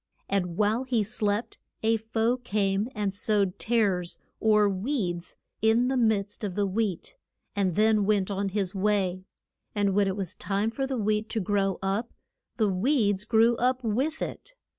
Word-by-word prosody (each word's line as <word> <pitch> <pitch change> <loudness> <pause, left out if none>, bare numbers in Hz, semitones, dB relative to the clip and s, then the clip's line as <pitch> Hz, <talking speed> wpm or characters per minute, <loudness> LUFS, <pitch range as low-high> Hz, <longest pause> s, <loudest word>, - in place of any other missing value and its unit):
And 180 -3 -1
while 215 +4 +2
he 245 -4 +1
slept 210 0 -1 0.2
a 225 +1 +3
foe 225 +2 0
came 205 -2 0
and 205 -2 -1
sowed 200 -2 0
tares, 200 -7 +1 0.2
or 210 -1 +4
weeds, 190 -4 -2 0.3
in 225 +3 +3
the 265 - 0
midst 215 -4 0
of 195 -3 -3
the 205 - +1
wheat, 200 - -2 0.4
and 190 -4 +1
then 215 -1 +3
went 200 -1 +1
on 200 0 -1
his 195 -2 -2
way. 190 -2 0 0.5
And 200 -2 +1
when 200 0 +3
it 190 - -1
was 190 -4 -3
time 205 +2 -1
for 270 +3 -2
the 265 -1 -2
wheat 215 0 0
to 225 - -1
grow 195 -1 0
up, 200 +5 -1 0.4
the 220 -3 +3
weeds 205 -1 +1
grew 230 +1 +4
up 255 +1 +1
with 265 +9 -1
it. - - -7
210 Hz, 165 wpm, -27 LUFS, 195-225 Hz, 0.5 s, or